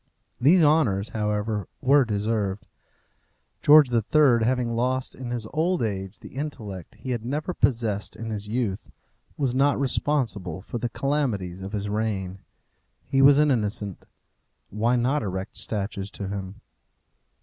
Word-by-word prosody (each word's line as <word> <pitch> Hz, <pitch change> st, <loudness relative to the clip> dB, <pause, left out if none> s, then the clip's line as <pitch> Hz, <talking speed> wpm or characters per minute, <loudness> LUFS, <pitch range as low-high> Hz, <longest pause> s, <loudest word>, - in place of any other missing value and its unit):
These 165 Hz, +7 st, +5 dB
honours, 130 Hz, -10 st, +3 dB
however, 105 Hz, -1 st, -2 dB
were 140 Hz, +1 st, +4 dB
deserved. 105 Hz, -1 st, -1 dB, 1.0 s
George 145 Hz, -3 st, +7 dB
III., 120 Hz, +1 st, +4 dB
having 120 Hz, -1 st, 0 dB
lost 130 Hz, +2 st, -1 dB
in 130 Hz, -2 st, -7 dB
his 120 Hz, -2 st, -3 dB
old 170 Hz, 0 st, +1 dB
age 95 Hz, -3 st, -3 dB
the -, -, -13 dB
intellect 105 Hz, -, -6 dB
he 130 Hz, -, -6 dB
had 120 Hz, -3 st, -2 dB
never 150 Hz, +8 st, -2 dB
possessed 115 Hz, -9 st, 0 dB
in 115 Hz, 0 st, -6 dB
his 105 Hz, -1 st, -4 dB
youth, 110 Hz, -3 st, -2 dB, 0.5 s
was 135 Hz, -4 st, 0 dB
not 140 Hz, +2 st, +2 dB
responsible 120 Hz, -, 0 dB
for 120 Hz, -, -5 dB
the 120 Hz, -, -2 dB
calamities 115 Hz, -11 st, -2 dB
of 95 Hz, +2 st, -7 dB
his 105 Hz, -1 st, -2 dB
reign. 100 Hz, -3 st, -2 dB, 0.7 s
He 135 Hz, +1 st, +2 dB
was 140 Hz, +1 st, +7 dB
an 150 Hz, -1 st, +4 dB
innocent. 105 Hz, -5 st, -2 dB, 0.6 s
Why 115 Hz, +4 st, +1 dB
not 130 Hz, +5 st, +1 dB
erect 95 Hz, -2 st, -4 dB
statues 100 Hz, -2 st, -3 dB
to 100 Hz, -, -5 dB
him? 100 Hz, -1 st, -6 dB
115 Hz, 140 wpm, -25 LUFS, 100-135 Hz, 1.0 s, George